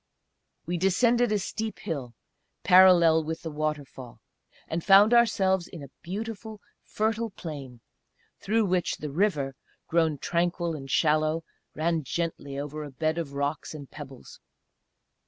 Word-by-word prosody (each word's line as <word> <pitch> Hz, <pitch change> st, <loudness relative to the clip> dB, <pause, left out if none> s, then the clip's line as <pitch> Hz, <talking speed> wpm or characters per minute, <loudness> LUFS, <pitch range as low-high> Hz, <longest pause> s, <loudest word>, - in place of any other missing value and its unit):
We 175 Hz, +2 st, -2 dB
descended 235 Hz, +6 st, +3 dB
a 210 Hz, -, +2 dB
steep 215 Hz, +3 st, -4 dB
hill, 140 Hz, -, -5 dB, 0.5 s
parallel 175 Hz, -3 st, +6 dB
with 160 Hz, +1 st, -5 dB
the 165 Hz, -, -5 dB
waterfall, 150 Hz, -5 st, -5 dB, 0.5 s
and 165 Hz, +1 st, -3 dB
found 200 Hz, +4 st, +7 dB
ourselves 195 Hz, -6 st, +3 dB
in 165 Hz, -6 st, -10 dB
a 140 Hz, -, -11 dB
beautiful 215 Hz, +3 st, -6 dB, 0.2 s
fertile 225 Hz, +1 st, -1 dB
plain, 140 Hz, -, -8 dB, 0.6 s
through 220 Hz, +1 st, +1 dB
which 180 Hz, -2 st, 0 dB
the 150 Hz, -2 st, -6 dB
river, 150 Hz, -6 st, 0 dB, 0.3 s
grown 160 Hz, -2 st, +1 dB
tranquil 170 Hz, +2 st, -1 dB
and 135 Hz, -2 st, -8 dB
shallow, 155 Hz, +2 st, +2 dB, 0.3 s
ran 165 Hz, +1 st, 0 dB
gently 145 Hz, -1 st, -4 dB
over 150 Hz, +2 st, -5 dB
a 145 Hz, -, -7 dB
bed 155 Hz, +5 st, -1 dB
of 145 Hz, -4 st, -5 dB
rocks 140 Hz, +3 st, -3 dB
and 145 Hz, -3 st, -10 dB
pebbles. 135 Hz, -4 st, -11 dB
165 Hz, 135 wpm, -27 LUFS, 150-195 Hz, 0.6 s, found